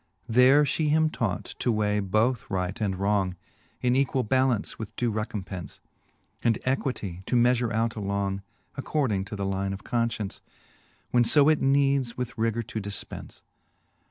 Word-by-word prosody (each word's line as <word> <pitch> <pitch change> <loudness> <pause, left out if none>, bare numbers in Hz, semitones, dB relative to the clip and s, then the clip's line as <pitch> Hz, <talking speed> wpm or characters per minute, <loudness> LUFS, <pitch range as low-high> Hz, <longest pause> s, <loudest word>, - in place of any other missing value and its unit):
VII. - - -5
There 130 +4 +7
fhe 150 +2 0
him 155 +1 +3
taught 100 - -1 0.2
to 125 - +1
weigh 105 -1 +1
both 110 +5 +1
right 95 +2 -2
and 100 -3 0
wrong. 100 -2 +1 0.5
In 125 0 +3
equall 135 -1 +1
ballance 130 -3 +1
with 110 -3 -7
due 120 -2 0
recompence, 105 -5 -5 0.6
And 115 -2 +3
equitie 125 -9 -2
to - - 0
meafure 120 -1 +3
out 115 +1 0
along, 100 -1 -2 0.3
According 115 -11 0
to 100 - -7
the 100 -1 -3
line 95 0 -1
of 95 - -8
confcience, 115 -4 -2 0.7
When 120 - +4
fb 145 +5 +5
it 155 - +1
needs 135 -2 +2
with 125 -1 -4
rigour 115 +1 0
to 110 0 -5
difpence. 100 0 -7
115 Hz, 155 wpm, -27 LUFS, 100-130 Hz, 0.7 s, There